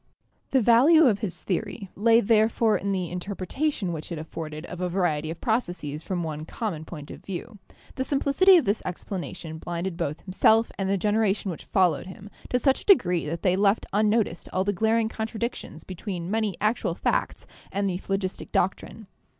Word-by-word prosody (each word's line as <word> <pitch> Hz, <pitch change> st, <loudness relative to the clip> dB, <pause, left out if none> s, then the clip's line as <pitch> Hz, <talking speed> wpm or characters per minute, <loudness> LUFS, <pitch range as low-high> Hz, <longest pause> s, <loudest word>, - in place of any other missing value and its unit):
The 265 Hz, -3 st, +3 dB
value 270 Hz, +9 st, +6 dB
of 215 Hz, -6 st, +3 dB
his 200 Hz, -4 st, -4 dB
theory 195 Hz, +1 st, -3 dB
lay 230 Hz, +3 st, +5 dB
therefore 220 Hz, 0 st, +3 dB
in 200 Hz, -, -1 dB
the 185 Hz, -3 st, -2 dB
interpreta 200 Hz, -, -2 dB
tion 190 Hz, -10 st, -3 dB
which 160 Hz, +2 st, -7 dB
it 170 Hz, -, -3 dB
afforded 155 Hz, 0 st, -6 dB
of 180 Hz, 0 st, -7 dB
a 180 Hz, -, 0 dB
variety 160 Hz, -4 st, 0 dB
of 165 Hz, -, -6 dB
processes 175 Hz, -, -2 dB
from 175 Hz, 0 st, -3 dB
one 155 Hz, -1 st, -4 dB
common 165 Hz, -3 st, -4 dB
point 150 Hz, -4 st, -9 dB
of -, -, -11 dB
view. 195 Hz, +3 st, -7 dB, 0.4 s
The 260 Hz, -, 0 dB
simplicity 290 Hz, +8 st, +5 dB
of 330 Hz, -, +2 dB
this 205 Hz, +2 st, 0 dB
explanation 175 Hz, -3 st, -6 dB
blinded 175 Hz, +1 st, -4 dB
both 155 Hz, -3 st, -3 dB
himself 220 Hz, +4 st, +3 dB
and 195 Hz, -1 st, 0 dB
the 200 Hz, -, +2 dB
generation 210 Hz, -1 st, +1 dB
which 165 Hz, -, -8 dB
followed 185 Hz, -4 st, +2 dB
him 195 Hz, +2 st, -11 dB, 0.2 s
to 250 Hz, -, +2 dB
such 265 Hz, +2 st, +2 dB
a -, -, -15 dB
degree 180 Hz, -, +4 dB
that 165 Hz, +3 st, -4 dB
they 185 Hz, -1 st, +3 dB
left 200 Hz, +2 st, +2 dB
unnoticed 210 Hz, -4 st, +1 dB
all 185 Hz, -, +1 dB
the 205 Hz, +1 st, 0 dB
glar 220 Hz, +4 st, +2 dB
ing 225 Hz, -, +1 dB
contradictions 225 Hz, +2 st, -5 dB
between 185 Hz, -1 st, -5 dB
many 215 Hz, -4 st, 0 dB
actual 215 Hz, +3 st, 0 dB
facts -, -, -1 dB, 0.3 s
and 200 Hz, +1 st, 0 dB
the 180 Hz, -1 st, -2 dB
phlogistic 195 Hz, -1 st, -3 dB
doctrine. 195 Hz, +4 st, -1 dB
195 Hz, 185 wpm, -26 LUFS, 175-220 Hz, 0.4 s, value